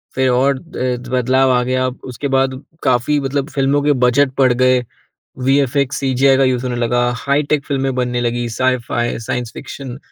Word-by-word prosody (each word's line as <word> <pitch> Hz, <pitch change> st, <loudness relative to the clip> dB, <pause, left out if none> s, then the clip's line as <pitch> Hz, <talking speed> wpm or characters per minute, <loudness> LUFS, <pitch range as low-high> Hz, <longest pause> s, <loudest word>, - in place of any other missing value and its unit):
फ़िर 130 Hz, 0 st, +2 dB
और 135 Hz, +3 st, +2 dB
अ, 130 Hz, -6 st, -3 dB
बदलाव 130 Hz, +1 st, +2 dB
आ 125 Hz, 0 st, +3 dB
गया। 130 Hz, +1 st, 0 dB, 0.2 s
उसके 130 Hz, +2 st, -5 dB
बाद 130 Hz, 0 st, +1 dB, 0.2 s
काफ़ी 130 Hz, +4 st, +2 dB
मतलब 140 Hz, +2 st, -2 dB
फ़िल्मों 140 Hz, 0 st, +1 dB
के 145 Hz, 0 st, +3 dB
बजट 130 Hz, +2 st, +3 dB
पड़ 130 Hz, -2 st, +4 dB
गए 130 Hz, 0 st, +2 dB, 0.6 s
वीएफएक्स, 140 Hz, 0 st, +1 dB
सीजीआई 135 Hz, 0 st, +3 dB
का 135 Hz, -, +3 dB
यूज़ 130 Hz, -1 st, +1 dB
होने 125 Hz, -, -2 dB
लगा, 120 Hz, +1 st, +1 dB
हाईटेक 140 Hz, +2 st, 0 dB
फ़िल्में 135 Hz, -1 st, -1 dB
बनने 125 Hz, -1 st, -1 dB
लगी 120 Hz, 0 st, -1 dB
साइ-फाई, 120 Hz, 0 st, -1 dB
साइंस 120 Hz, 0 st, -4 dB
फिक्शन। 135 Hz, -2 st, -8 dB
130 Hz, 165 wpm, -17 LUFS, 125-140 Hz, 0.6 s, पड़